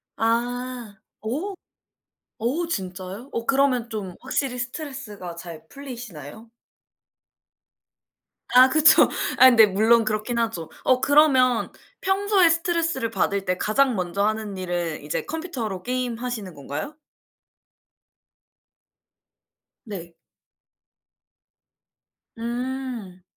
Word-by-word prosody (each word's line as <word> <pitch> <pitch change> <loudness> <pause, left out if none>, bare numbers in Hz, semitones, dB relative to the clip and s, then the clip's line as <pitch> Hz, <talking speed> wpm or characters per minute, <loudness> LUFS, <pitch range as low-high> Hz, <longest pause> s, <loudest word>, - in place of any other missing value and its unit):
아. 240 0 -2 0.3
어. 300 - -3 0.9
어 305 +9 0
진짜요? 190 - -5
어 230 - -3
그러면 265 -3 +2
좀 195 -5 -5
확실히 265 -3 -2
스트레스가 245 - -6
잘 170 -2 -10
풀리시나요? 230 - -10 2.0
아 255 +1 +9
그쵸. 310 +3 +6 0.3
아 - - +8
근데 230 -3 +7
물론 220 +3 +3
그렇긴 215 +3 -1
하죠. 220 -9 -2
어 255 -1 +3
그러면 265 -5 +4 0.3
평소에 385 -2 +3
스트레스를 330 -7 0
받을 200 -3 0
때 180 0 0
가장 250 +5 +2
먼저 185 +1 -1
하는 215 -1 -2
일은 175 -3 -3
이제 150 - -3
컴퓨터로 255 - -5
게임하시는 245 -5 -3
건가요? 145 - -6 2.9
네. 175 -6 -8 2.2
음. 240 -5 -5
235 Hz, 200 characters per minute, -24 LUFS, 200-265 Hz, 2.9 s, 아